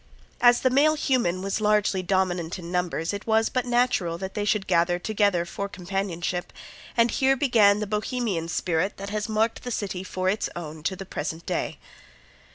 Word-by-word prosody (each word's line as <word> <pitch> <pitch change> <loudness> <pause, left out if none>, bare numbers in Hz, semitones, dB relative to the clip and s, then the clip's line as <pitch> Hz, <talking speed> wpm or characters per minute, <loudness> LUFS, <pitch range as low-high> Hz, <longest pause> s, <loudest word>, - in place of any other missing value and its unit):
As 240 0 +6
the 255 - +3
male 300 +4 +4
human 240 - 0
was 195 +2 -2
largely 210 -2 +2
dominant 185 -2 0
in 175 -1 -8
numbers 180 -1 -1
it 200 +2 -6
was 220 0 +3
but 250 -1 -1
natural 240 -9 +1
that 190 +2 -6
they 205 - -2
should 210 -1 +1
gather 175 -1 +2
together 200 -2 +1
for 200 +3 -5
companionship, 180 -2 -3 0.5
and 230 0 +4
here 270 0 +3
began 225 -7 +4
the - - 0
Bohemian 210 -4 -2
spirit 175 +2 -1
that 200 +1 -6
has 210 +1 -2
marked 220 +1 0
the 250 - -6
city 195 -5 -3
for 185 0 -3
its 200 +3 0
own 160 -2 -7
to 190 +5 -1
the 195 - -8
present 160 -1 -5
day. - - -2
195 Hz, 180 wpm, -25 LUFS, 175-220 Hz, 0.5 s, As